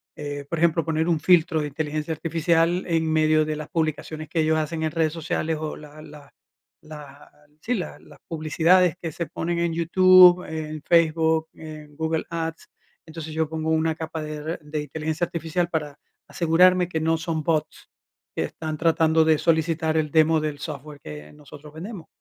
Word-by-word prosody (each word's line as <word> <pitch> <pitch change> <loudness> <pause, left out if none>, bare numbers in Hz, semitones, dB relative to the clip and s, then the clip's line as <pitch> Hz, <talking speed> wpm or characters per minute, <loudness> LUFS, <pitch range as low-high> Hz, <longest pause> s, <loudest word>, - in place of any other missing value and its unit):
eh, 145 -1 -6
por 170 - -2
ejemplo, 165 0 +2
poner 160 +1 0
un 165 -2 +2
filtro 160 -2 +3
de 150 - -2
inteligencia 155 +2 -3
artificial 165 +2 +1
en 160 -2 0
medio 155 0 +3
de 155 0 -2
las 155 -1 -7
publicaciones 155 -1 -3
que 160 0 0
ellos 160 0 +2
hacen 160 +1 -2
en 155 - 0
redes 160 -1 0
sociales, 160 0 -2
o, 155 -1 -4
la 150 0 -13
la 145 -2 -14 0.5
la, 150 -2 -12 0.3
sí, 245 - -1
la 180 - -5
las - - -17
publicidades 165 +2 +2
que 165 - -4
se 170 +3 -4
ponen 170 +1 -3
en 170 -1 0
YouTube, 180 +1 +6
en 155 -1 -5
Facebook, 160 -1 +2
en 155 -2 -11
Google 160 0 -1
Ads. 165 -1 -5 0.4
Entonces 160 -1 -8
yo 160 -1 -1
pongo 160 0 -3
una 160 0 +1
capa 160 0 -5
de 155 0 -5
r 155 +3 -5
de 150 0 -4
inteligencia 155 +3 -3
artificial 170 +1 -2
para 150 -3 -3 0.3
asegurarme 180 +2 +3
que 160 -3 -2
no 160 +1 +1
son 160 -1 -3
bots 155 -1 -2 0.5
que - - 0
están 155 -1 -6
tratando 160 0 +3
de 160 -1 +4
solicitar 160 -1 +1
el 155 -1 0
demo 160 0 +4
del 150 -1 -3
software 150 -1 -8
que 75 - -10
nosotros 150 0 -13
vendemos, 175 +2 -8
160 Hz, 180 wpm, -24 LUFS, 155-165 Hz, 0.5 s, YouTube